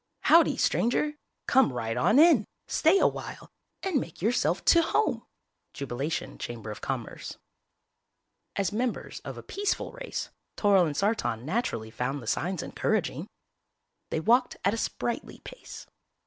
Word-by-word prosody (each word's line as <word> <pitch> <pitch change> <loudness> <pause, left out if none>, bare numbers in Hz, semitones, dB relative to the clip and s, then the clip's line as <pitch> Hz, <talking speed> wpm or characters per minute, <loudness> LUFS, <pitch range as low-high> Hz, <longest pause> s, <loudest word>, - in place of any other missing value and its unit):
HOWDY, 315 -4 +5
STRANGER! 285 +6 +1 0.3
COME 265 - +4
RIGHT 115 -2 -3
ON 125 - +3
IN, 300 -9 +6 0.2
STAY 325 +5 +4
AWHILE - - -1 0.3
AND 350 -9 +1
MAKE 165 - -9
YOURSELF 225 +7 +1
TO 335 - +6
HOME! 430 +6 0 0.5
Jubilation 140 +3 -4
Chamber 115 -3 -6
of 105 - -9
Commerce - - -5 1.2
As 200 0 0
members 240 +3 -2
of - - -8
a - - -8
peaceful 405 +1 -2
race, - - -5 0.3
Toryl 195 -4 +4
and 145 -2 -4
Sartan 195 - 0
naturally 155 - -2
found 130 +5 -2
the 120 - -10
signs 175 +9 -1
encouraging. - - -1 0.8
They - - -1
walked 240 +8 +3
at 200 - +3
a - - -2
sprightly 235 +1 -3
pace. - - -10
205 Hz, 135 wpm, -28 LUFS, -, 1.2 s, IN